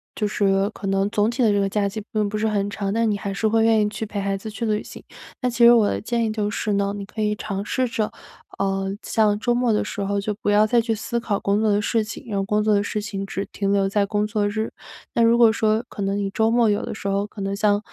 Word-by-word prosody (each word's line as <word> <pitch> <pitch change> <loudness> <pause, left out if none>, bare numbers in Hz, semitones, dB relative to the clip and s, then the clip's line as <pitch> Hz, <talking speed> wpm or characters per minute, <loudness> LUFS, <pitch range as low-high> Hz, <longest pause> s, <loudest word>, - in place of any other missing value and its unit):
就 210 - -1
是 195 -1 +1
可 210 -2 -7
能 195 +1 +1
总 210 +1 +1
体 245 +2 0
的 220 - +4
这 205 - +2
个 195 - +1
假 200 0 0
期 215 +2 -5
并 210 -2 +1
不 215 - -3
是 220 +1 0
很 205 -2 0
长， 200 -1 -3
但 230 0 +1
你 205 - -1
还 200 0 -4
是 195 - -3
会 225 +1 +3
愿 225 -1 +4
意 210 - +1
去 220 - -5
陪 205 -1 -4
孩 195 0 -1
子 220 +3 -7
去 225 +2 -4
旅 215 -1 0
行。 - - -11 0.4
那 250 - +1
其 235 0 +4
实 235 - +9
我 225 -3 +4
的 - - -1
建 235 +2 -1
议 220 - 0
就 210 -1 -1
是 210 0 -2
呢， 200 0 0
你 200 - -5
可 215 +2 -6
以 210 0 +1
尝 200 -1 -4
试 255 +2 0
着， 220 -2 -1 0.5
呃， 195 0 -1
像 210 -2 +2
周 240 +3 0
末 245 -1 +1
的 210 - +1
时 200 +1 -5
候 200 +1 -1
就 210 +1 -2
不 - - 0
要 205 +1 +5
再 235 +2 +3
去 225 -1 -1
思 235 +2 -3
考 210 -4 -1
工 200 +1 +1
作 220 - +2
的 205 - +2
事 220 +1 +1
情， 225 +5 -8
让 200 -2 -1
工 210 +1 +1
作 215 0 +3
的 200 - +3
事 205 +1 -2
情 205 -1 -4
只 195 +1 -3
停 200 -1 -1
留 195 -1 +2
在 200 +1 +1
工 210 0 0
作 210 -1 0
日。 220 +2 -3 0.4
那 - - +1
如 230 +1 +5
果 235 -2 +6
说 220 0 +1
可 - - -7
能 195 0 0
你 200 -1 -1
周 220 +3 +2
末 235 0 +3
有 205 - +1
的 - - -5
时 200 - -6
候， 200 +1 0
可 210 - -13
能 195 0 -2
像， 205 0 +2
210 Hz, 315 characters per minute, -23 LUFS, 200-220 Hz, 0.5 s, 实